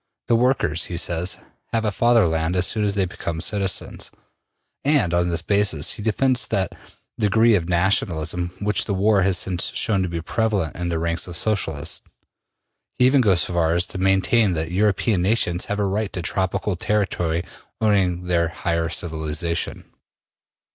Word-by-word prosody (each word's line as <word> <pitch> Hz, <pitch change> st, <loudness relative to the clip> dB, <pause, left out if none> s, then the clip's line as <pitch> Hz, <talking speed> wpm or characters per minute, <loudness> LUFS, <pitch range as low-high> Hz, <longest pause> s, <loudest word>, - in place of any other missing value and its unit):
The 120 Hz, -, +4 dB
workers, 115 Hz, -, +2 dB
he 85 Hz, -, -5 dB
says, 85 Hz, +1 st, -1 dB, 0.4 s
have 115 Hz, -1 st, 0 dB
a 105 Hz, -, +1 dB
Fatherland 90 Hz, -8 st, +2 dB
as 90 Hz, 0 st, +2 dB
soon 105 Hz, +2 st, 0 dB
as 100 Hz, -1 st, 0 dB
they 100 Hz, -2 st, +2 dB
become 85 Hz, -2 st, -5 dB
citizens, 100 Hz, +2 st, -2 dB, 0.7 s
and 135 Hz, -, +2 dB
on 85 Hz, 0 st, +2 dB
this 85 Hz, -1 st, -1 dB
basis 100 Hz, -7 st, +1 dB
he -, -, -5 dB
defends 125 Hz, +4 st, +2 dB
that 95 Hz, -3 st, -1 dB, 0.5 s
degree 110 Hz, +2 st, +4 dB
of 90 Hz, -4 st, +1 dB
nationalism 90 Hz, -2 st, +1 dB
which 105 Hz, -1 st, 0 dB
the 100 Hz, -, -2 dB
war 100 Hz, +1 st, +3 dB
has 95 Hz, -1 st, +2 dB
since 90 Hz, +4 st, -1 dB
shown 110 Hz, -5 st, +1 dB
to 90 Hz, -, -1 dB
be 85 Hz, -1 st, -3 dB
prevalent 100 Hz, -2 st, -1 dB
in 85 Hz, 0 st, -3 dB
the 85 Hz, -, -1 dB
ranks 85 Hz, +2 st, -1 dB
of 85 Hz, -2 st, -4 dB
Socialists. 90 Hz, -10 st, -1 dB, 1.0 s
He 125 Hz, -, +4 dB
even 130 Hz, +1 st, +5 dB
goes 95 Hz, -7 st, +3 dB
so -, -, -2 dB
far 85 Hz, -1 st, +2 dB
as 85 Hz, +1 st, +2 dB
to 95 Hz, -, -5 dB
maintain 95 Hz, +2 st, +3 dB
that 80 Hz, 0 st, -3 dB
European 100 Hz, 0 st, +1 dB
nations 90 Hz, -3 st, +1 dB
have 105 Hz, -, -3 dB
a 105 Hz, -, 0 dB
right 100 Hz, +1 st, -1 dB
to 90 Hz, -3 st, -4 dB
tropical 95 Hz, +2 st, -1 dB
territory 85 Hz, -4 st, -1 dB, 0.4 s
owing 95 Hz, -5 st, +1 dB
to -, -, -11 dB
their 85 Hz, -1 st, +1 dB
higher 85 Hz, -1 st, -2 dB
civilization. 80 Hz, 0 st, -2 dB
95 Hz, 170 wpm, -22 LUFS, 85-105 Hz, 1.0 s, even